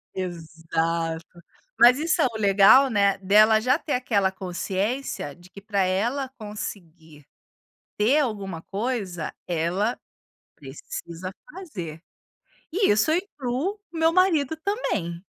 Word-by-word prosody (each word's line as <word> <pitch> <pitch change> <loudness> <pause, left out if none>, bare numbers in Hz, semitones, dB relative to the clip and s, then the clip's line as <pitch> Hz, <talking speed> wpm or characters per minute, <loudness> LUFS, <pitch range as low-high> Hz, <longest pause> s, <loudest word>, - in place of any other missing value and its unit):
Exato. 165 -1 -3 0.4
Mas 245 +2 +8
isso 320 +2 +1
é - - +4
o 230 -3 -6
legal, 205 +7 +6
né, 200 -3 +2
dela 215 +3 +5
já 255 +6 +2
ter 300 - -3
aquela 205 -7 +1
consciência 190 - -3
de 175 +1 -18
que 200 - -12
para 200 -1 -1
ela 235 +9 -1
conseguir 170 - -8 0.7
ter 240 +8 +3
alguma 200 - -3
coisa, 200 -7 -3
ela 180 +7 -1 0.6
precisa 165 +6 -8 0.2
fazer. 190 - -7 0.7
E 390 - +2
isso 215 +9 +3
eu 320 - +3
incluo 345 - -3
o 330 - -6
meu 325 0 +3
marido 320 -5 +2
também. 200 - -3
205 Hz, 120 wpm, -25 LUFS, 175-260 Hz, 0.7 s, Mas